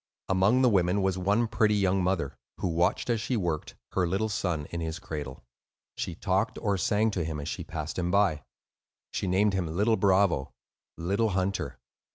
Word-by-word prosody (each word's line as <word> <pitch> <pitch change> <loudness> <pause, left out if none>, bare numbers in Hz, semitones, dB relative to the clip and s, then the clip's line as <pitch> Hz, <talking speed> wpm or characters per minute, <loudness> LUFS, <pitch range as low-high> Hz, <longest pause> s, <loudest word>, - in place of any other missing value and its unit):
Among 95 +7 +4
the 125 - +6
women 95 -1 +2
was 95 -1 0
one 105 +6 +2
pretty 105 -1 +2
young 95 -1 +2
mother, 90 -7 0 0.2
who 95 - -1
watched, 85 +4 +1
as 115 -2 0
she 120 +2 -1
worked, 85 -6 -2 0.2
her 90 -2 +1
little 100 +5 0
son 90 -7 -1
in 85 - -3
his 80 0 -3
cradle. 75 -7 -6 0.5
She 85 - -4
talked 95 +4 0
or 100 -3 +1
sang 110 +5 +2
to 90 -4 -1
him 80 -1 -3
as 70 - -5
she - - -4
passed 80 +1 -5
him 90 -1 0
by. 95 -6 +2 0.7
She - - -2
named 100 +3 +3
him 95 -3 0
"Little 105 +8 +2
Bravo," 95 -8 +2 0.4
"Little 100 +7 +1
Hunter." 95 0 -1
95 Hz, 185 wpm, -28 LUFS, 85-105 Hz, 0.7 s, the